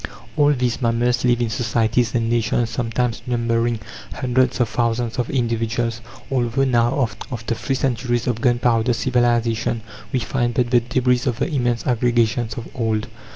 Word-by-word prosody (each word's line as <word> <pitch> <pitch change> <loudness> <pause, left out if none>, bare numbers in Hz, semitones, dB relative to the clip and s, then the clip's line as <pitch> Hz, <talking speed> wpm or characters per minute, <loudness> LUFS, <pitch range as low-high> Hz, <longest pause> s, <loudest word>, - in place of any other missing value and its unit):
All 145 -1 +4
these 125 -1 -1
mammals 120 +1 +1
live 120 -1 +2
in 115 -2 0
societies 115 +1 +1
and 115 -1 +1
nations 115 0 +1
sometimes 120 0 -1
numbering 115 -1 0 0.4
hundreds 130 +1 +1
of 120 - +3
thousands 115 +1 -1
of 125 - -1
individuals, 115 -1 -1 0.3
although 125 0 +1
now, 120 0 +2 0.2
after 115 -1 -3
three 135 +4 -2
centuries 120 -2 0
of 120 -3 -1
gunpowder 120 -1 +2
civilization, 120 -2 +1 0.3
we - - +1
find 120 0 -1
but 120 -2 +1
the 120 - +6
debris 125 +1 +1
of 120 -3 0
the 150 +5 -2
immense 120 -4 0
aggregations 120 -1 +1
of 120 - -5
old. 110 -3 -1
120 Hz, 155 wpm, -21 LUFS, 115-125 Hz, 0.4 s, the